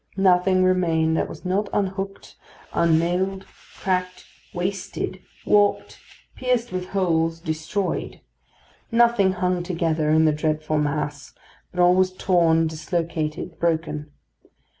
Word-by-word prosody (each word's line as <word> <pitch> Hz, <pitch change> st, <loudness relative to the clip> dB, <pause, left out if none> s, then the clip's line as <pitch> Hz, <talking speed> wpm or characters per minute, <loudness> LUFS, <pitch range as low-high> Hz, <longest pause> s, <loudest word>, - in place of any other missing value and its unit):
Nothing 185 Hz, 0 st, +4 dB
remained 165 Hz, -3 st, +2 dB
that -, -, -1 dB
was -, -, -10 dB
not 195 Hz, +3 st, 0 dB
unhooked, 195 Hz, 0 st, -3 dB, 0.4 s
unnailed, 175 Hz, +4 st, +1 dB, 0.3 s
cracked, 180 Hz, -1 st, -2 dB, 0.3 s
wasted, 185 Hz, +2 st, -4 dB, 0.2 s
warped, 205 Hz, -1 st, +2 dB, 0.4 s
pierced 250 Hz, -2 st, 0 dB
with 185 Hz, 0 st, -4 dB
holes, 165 Hz, -4 st, 0 dB
destroyed: 160 Hz, +5 st, -3 dB, 0.7 s
nothing 230 Hz, -5 st, +4 dB
hung 180 Hz, -1 st, 0 dB
together 165 Hz, -3 st, -1 dB
in 160 Hz, +1 st, +4 dB
the 155 Hz, -, +4 dB
dreadful 155 Hz, 0 st, -1 dB
mass, 145 Hz, -1 st, -3 dB, 0.4 s
but 180 Hz, -, -7 dB
all 180 Hz, 0 st, +6 dB
was 185 Hz, 0 st, +3 dB
torn, 170 Hz, -3 st, +3 dB
dislocated, 160 Hz, 0 st, -3 dB
broken. 160 Hz, -3 st, -1 dB
180 Hz, 110 wpm, -23 LUFS, 160-190 Hz, 0.7 s, all